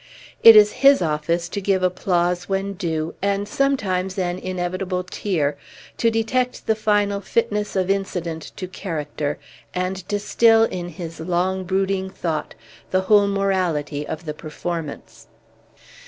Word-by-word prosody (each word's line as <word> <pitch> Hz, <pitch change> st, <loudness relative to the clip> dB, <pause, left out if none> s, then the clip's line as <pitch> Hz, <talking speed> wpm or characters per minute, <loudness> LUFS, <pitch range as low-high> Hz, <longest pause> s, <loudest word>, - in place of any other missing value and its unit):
It 225 Hz, -1 st, +10 dB
is 210 Hz, -1 st, +8 dB
his 275 Hz, 0 st, +7 dB
office 165 Hz, +2 st, -1 dB
to 200 Hz, -, -4 dB
give 190 Hz, -1 st, +1 dB
applause 180 Hz, -1 st, 0 dB
when 195 Hz, +1 st, -1 dB
due, 165 Hz, -4 st, -3 dB
and 200 Hz, +1 st, 0 dB
sometimes 200 Hz, -8 st, 0 dB
an 180 Hz, -1 st, -1 dB
inevitable 185 Hz, 0 st, -3 dB
tear, 165 Hz, -6 st, -1 dB, 0.4 s
to 230 Hz, -, +3 dB
detect 245 Hz, +3 st, -1 dB
the 220 Hz, -, +3 dB
final 205 Hz, -2 st, +1 dB
fitness 210 Hz, 0 st, -1 dB
of 190 Hz, 0 st, +1 dB
incident 175 Hz, -5 st, -3 dB
to 185 Hz, -, -5 dB
character, 150 Hz, -5 st, -4 dB, 0.4 s
and 185 Hz, +1 st, -2 dB
distil 225 Hz, +2 st, +4 dB
in 180 Hz, -5 st, -2 dB
his 165 Hz, -1 st, -8 dB
long 180 Hz, +3 st, -1 dB
brooding 190 Hz, +1 st, 0 dB
thought 165 Hz, -, -4 dB, 0.3 s
the 185 Hz, -, +2 dB
whole 205 Hz, +1 st, +4 dB
morality 180 Hz, -7 st, -1 dB
of 160 Hz, +2 st, -6 dB
the 150 Hz, -, -3 dB
performance. 155 Hz, 0 st, -6 dB
185 Hz, 135 wpm, -22 LUFS, 170-200 Hz, 0.4 s, It